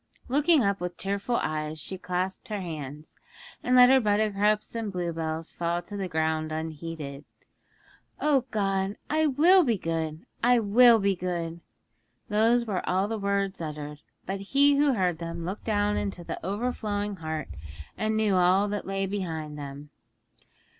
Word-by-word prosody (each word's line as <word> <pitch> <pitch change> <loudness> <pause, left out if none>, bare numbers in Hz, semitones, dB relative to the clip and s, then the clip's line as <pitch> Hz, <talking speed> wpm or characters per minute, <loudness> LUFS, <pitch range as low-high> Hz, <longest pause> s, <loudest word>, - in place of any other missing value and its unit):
Looking 295 +2 +4
up 200 -1 +1
with 180 0 -4
tearful 200 +5 -1
eyes, 155 0 -2
she 190 - -4
clasped 185 +5 -3
her 210 -3 -3
hands, 150 -4 -7 0.5
and 250 - +2
let 250 0 +8
her 265 - +6
buttercups 210 -1 +1
and 225 -3 -3
bluebells 165 -3 -3
fall 170 0 -2
to 205 - -9
the 195 -2 -2
ground 160 -1 -1
unheeded. 155 -2 -5 1.0
'O 280 -4 +2
God, 195 -2 -1
I 310 0 +3
will 340 +7 +6
be 235 -7 +1
good! 160 -2 -3 0.2
I 245 +1 +5
will 230 +2 +6
be 200 -2 +1
good!' 170 -2 -3 0.7
Those 225 +3 +3
were 195 -5 -1
all 190 +2 +2
the 225 0 -3
words 200 -2 -1
uttered, 150 -2 -6 0.3
but 195 +1 -3
He 280 +8 +4
who 285 -1 +4
heard 180 -7 0
them 170 0 -5
looked 190 +4 -5
down 210 -1 +1
into 195 -4 -3
the - - -6
overflowing 205 -1 -2
heart, 155 - -4 0.5
and 215 0 -1
knew 215 -2 +2
all 185 +2 +4
that 205 -1 -4
lay 195 0 -1
behind 165 -6 -4
them. 145 0 -8
195 Hz, 155 wpm, -27 LUFS, 165-215 Hz, 1.0 s, let